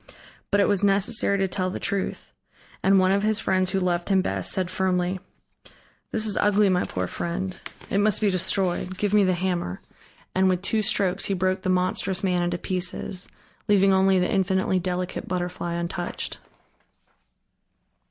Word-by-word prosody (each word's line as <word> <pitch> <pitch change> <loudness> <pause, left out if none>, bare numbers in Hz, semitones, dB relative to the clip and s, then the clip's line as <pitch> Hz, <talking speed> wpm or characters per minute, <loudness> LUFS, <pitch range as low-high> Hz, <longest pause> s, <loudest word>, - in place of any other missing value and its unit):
But 205 - +2
it 200 - +4
was 200 -1 +1
necessary 200 +1 +3
to 195 0 +1
tell 185 0 -2
the 185 - -5
truth, 200 -1 -3 0.5
and 195 0 +4
one 185 0 +4
of 200 +1 +2
his 215 0 +2
friends 185 -2 +1
who 195 - 0
loved 175 -1 -1
him 190 -2 +3
best 95 -1 -1
said 185 -2 -1
firmly: 185 0 0 0.9
"This 220 -1 +1
is 210 - +2
ugly, 205 0 +3
my 180 -1 +1
poor 90 0 -3
friend. 180 - -4 0.4
It 195 - +2
must 210 0 +3
be 210 -2 +2
destroyed. 185 0 0
Give 205 0 -1
me 210 -1 +5
the 185 -1 +2
hammer." 175 - -2 0.5
And 190 0 +3
with 185 0 0
two 215 +2 0
strokes 195 -2 0
he 195 - 0
broke 185 +1 0
the 185 - -2
monstrous 185 +1 0
man 180 -2 +1
into 175 0 -1
pieces, 180 +1 -3 0.4
leaving 195 -1 +4
only 190 0 +4
the 180 0 +2
infinitely 190 -1 +1
delicate 180 0 -3
butterfly 175 -1 -3
untouched. 170 +1 -4
185 Hz, 170 wpm, -25 LUFS, 180-195 Hz, 0.9 s, me